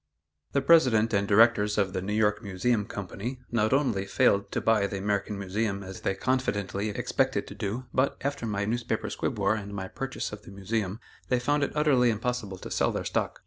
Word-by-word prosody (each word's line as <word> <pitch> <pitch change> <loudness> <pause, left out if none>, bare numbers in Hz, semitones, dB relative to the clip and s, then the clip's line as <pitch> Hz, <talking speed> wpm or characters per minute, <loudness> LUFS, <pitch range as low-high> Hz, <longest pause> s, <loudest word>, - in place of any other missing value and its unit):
The 140 - +1
president 125 -8 +5
and 100 0 +2
directors 105 0 +4
of 95 -3 +1
the 95 - -2
"New 105 +3 -2
York 105 -1 +2
Museum 105 +2 0
Company" 105 +6 -5
not 110 -2 +2
only 125 -8 +1
failed 100 0 +2
to - - 0
buy 110 -3 +2
the 100 - -4
American 100 +1 -1
Museum 100 +1 -2
as 95 0 -8
they 95 - 0
confidently 100 -4 -1
expected 100 - 0
to - - -9
do, 110 +4 -4
but, 130 +2 +1
after 140 -4 -2
my 100 -1 -1
newspaper 115 0 -2
squib 120 - -2
war 100 0 +2
and 100 -2 -5
my 95 -1 -4
purchase 135 +6 -4
of 105 -1 -8
the - - -14
Museum, 100 +1 -3 0.3
they 125 - +2
found 145 +4 +1
it - - -2
utterly 140 -5 +4
impossible 110 -3 -2
to - - -9
sell - - +2
their - - -3
stock. - - -2
105 Hz, 200 wpm, -28 LUFS, 100-120 Hz, 0.3 s, president